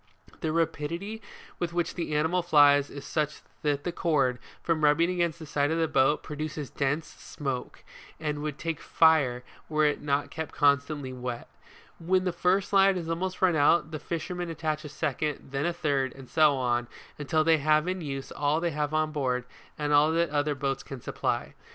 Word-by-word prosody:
The 160 - -1
rapidity 165 +6 -2 0.4
with 170 -1 -2
which 175 -1 -1
the 165 -4 -3
animal 160 +4 +2
flies 145 -4 +5
is 140 - -9
such 150 -1 -2 0.2
that 145 -1 0
the 175 - -2
cord, 140 -8 +1 0.2
from 165 -2 0
rubbing 160 +4 +4
against 170 -2 0
the 160 - -9
side 145 -1 0
of 160 - 0
the 165 -1 +2
boat, 135 +1 +2
produces 150 -1 -5
dense 145 +3 -1
smoke, 135 -4 -6 0.4
and 150 -2 -2
would 150 -1 -4
take 165 -2 -3
fire 140 -7 +3 0.3
were 155 -1 +2
it 150 - +1
not 145 0 -1
kept 160 -1 -6
constantly 140 -1 +1
wet. 125 -1 -5 0.5
When 185 +2 +1
the 180 -2 -1
first 180 +3 +1
line 195 0 +5
has 170 -3 -4
almost 185 +3 -2
run 180 -3 +4
out, 155 +1 +3
the 155 - -4
fisherman 175 +2 -4
attach 155 -1 -2
a 150 - -7
second, 150 0 -3
then 140 +4 -1
a - - +1
third, 140 -6 0
and 135 -1 -12
so 155 -1 +4
on 120 -2 0 0.4
till 155 +2 +3
they 160 -1 +4
have 155 +2 +3
in 185 0 -2
use 135 -3 -5
all 150 +2 +1
they 170 0 -1
have 150 0 -2
on 155 0 +1
board, 130 -4 -1 0.3
and 150 -1 -1
all 150 +2 +5
that 170 +1 +2
the - - -5
other 145 0 +1
boats 135 0 -2
can 135 - -8
supply. - - -2
155 Hz, 195 wpm, -28 LUFS, 145-165 Hz, 0.5 s, flies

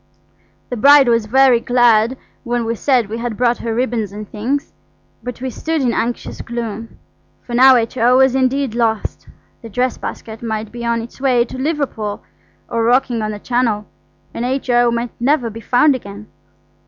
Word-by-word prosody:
The 245 - -2
bride 280 +3 +7
was 230 -2 +2
very 260 0 +5
glad 240 0 +3 0.3
when 240 -2 -1
we 230 - -1
said 245 -1 +1
we 225 +3 -5
had 235 -3 -4
brought 240 -1 +1
her 230 -1 -3
ribbons 235 -4 -1
and 210 +1 -8
things, 255 +9 -3 0.5
but 250 -1 -7
we 260 0 -3
stood 320 +5 -2
in 250 -4 +1
anxious 240 +1 -3
gloom, 230 -1 -6 0.5
for 240 - -9
now 260 +2 +7
H.O. 240 +1 +2
was 265 -1 +4
indeed 265 -1 0
lost. 225 -2 -2 0.3
The 230 - -9
dress 250 +3 -1
basket 220 0 -7
might 220 -2 -4
be 240 0 -7
on 235 -1 0
its 235 +3 -12
way 250 -3 +3
to 245 - -10
Liverpool, 260 -7 -3 0.4
or 230 - -2
rocking 245 0 +2
on 215 - -2
the 210 - -5
Channel, 225 -2 -1 0.5
and 230 - -4
H.O. 245 -2 +1
might 235 0 -2
never 245 -2 +1
be 225 +2 -9
found 250 +6 +3
again. 205 -4 -8
240 Hz, 175 wpm, -18 LUFS, 225-255 Hz, 0.5 s, bride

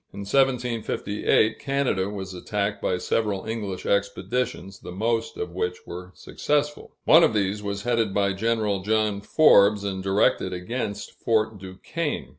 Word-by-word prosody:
In 100 - -8
1758, 115 -3 +1
Canada 135 -9 0
was 95 -2 -6
attacked 100 +2 -3
by 90 - 0
several 100 +1 -1
English 105 -5 -4
expeditions, 100 -1 -2
the - - -9
most 115 +4 -1
of 90 0 -4
which 90 0 -3
were 90 +1 -8
successful. 150 0 -2
One 165 +2 +7
of 110 - +3
these 100 0 0
was 100 0 -4
headed 115 -3 +1
by 100 0 +1
General 105 -1 0
John 105 0 0
Forbes, 105 -5 +5
and 95 -2 -3
directed 95 -1 +1
against 105 +2 -4
Fort 110 -2 0
Duquesne. 95 - -4
105 Hz, 140 wpm, -25 LUFS, 95-115 Hz, -, One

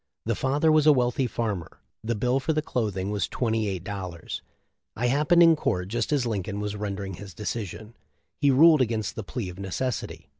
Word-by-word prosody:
The 115 - +1
father 145 +7 +2
was 155 -1 +4
a 150 - +9
weatlhy 125 0 +1
farmer; 105 -6 -3 0.3
the 115 +1 -1
bill 125 +5 +1
for 150 +4 0
the 155 0 0
clothing 100 -8 -2
was 105 -1 -1
twenty 115 -3 -1
eight 95 -3 -3
dollars. 90 -4 -6 0.5
I 120 - -1
happened 150 +7 +4
in 165 -1 +7
court 90 -10 -1
just 115 +3 -1
as 140 -4 +2
Lincoln 100 -2 -2
was 105 0 -3
rendering 100 -2 -4
his 95 -1 -10
decision. 110 +1 -5 0.5
He 145 - +4
ruled 155 +2 +6
against 110 -6 -1
the 110 - -4
plea 105 -2 -4
of 90 +1 -10
necessity. 105 +6 -4
110 Hz, 190 wpm, -26 LUFS, 100-130 Hz, 0.5 s, a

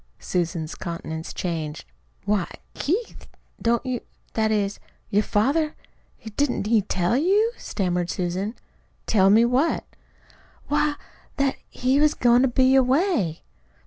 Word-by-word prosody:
Susan's 170 -3 -2
countenance 160 -1 -5
changed. 160 -4 -4 0.4
"Why, 200 -3 +1 0.2
Keith, 405 +10 -3 0.3
don't 235 +2 +1
you 255 -2 -2 0.3
that 220 -1 +1
is, 205 -2 0 0.3
your 205 - +4
father 285 +10 +1 0.6
Didn't 285 -7 +1
he 220 0 +4
tell 185 +1 0
you?" 395 - +3
stammered 180 -3 -2
Susan. 185 +5 -2 0.5
"Tell 195 -3 +4
me 220 +4 +6
what?" 260 +7 +1 0.8
"Why, 295 0 +2 0.4
that 275 -1 +2
that - - -19
he 260 +3 +1
was 305 0 +4
goin' 240 0 +4
to 265 - +4
be 260 +1 +3
away." 260 - +2
230 Hz, 125 wpm, -24 LUFS, 185-275 Hz, 0.8 s, me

